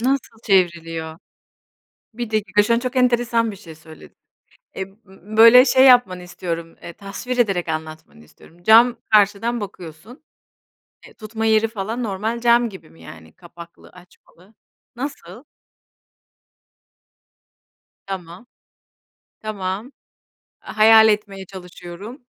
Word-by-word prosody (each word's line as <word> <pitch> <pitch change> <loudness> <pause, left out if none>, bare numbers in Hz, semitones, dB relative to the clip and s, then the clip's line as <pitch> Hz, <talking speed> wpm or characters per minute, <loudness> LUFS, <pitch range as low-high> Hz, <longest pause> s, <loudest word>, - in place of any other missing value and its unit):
Nasıl 250 -2 -2
çevriliyor? 165 -4 -1 1.0
1 240 -1 -6
dakika 205 -2 +1
şu 230 +3 +1
an - - +1
çok 255 +1 -5
enteresan 240 -2 +1
bir 200 - -10
şey 165 -5 -13
söyledin. 160 0 -16 0.6
Ib 190 0 -5 0.2
b 195 +3 -12
böyle, 230 +3 +8
şey, 260 0 +4
yapmanı 220 -8 +4
istiyorum, 170 -2 -7
ııı, 170 - -9
tasvir 215 +5 -7
ederek 195 -8 0
anlatmanı 155 - -7
istiyorum. 170 - -21
Cam 230 +4 +5 0.2
karşıdan 215 +3 +2
bakıyorsun, 195 - -11 0.9
eee, - - -18
tutma 220 0 -6
yeri 220 0 +3
falan 225 +3 -5
normal 220 +2 -3
cam 235 0 +3
gibi 190 - -14
mi, 80 +1 -20
yani, 80 -1 -14
kapaklı 170 0 -15
açmalı? 180 +2 -22 0.4
Nasıl? 275 +4 -8 2.6
Tamam, 185 +3 -8 0.9
tamam. 210 +3 -5 0.7
A - - -10
hayal 220 0 +7
etmeye 205 -2 -2
çalışıyorum. 185 - -11
205 Hz, 115 wpm, -20 LUFS, 175-230 Hz, 2.6 s, böyle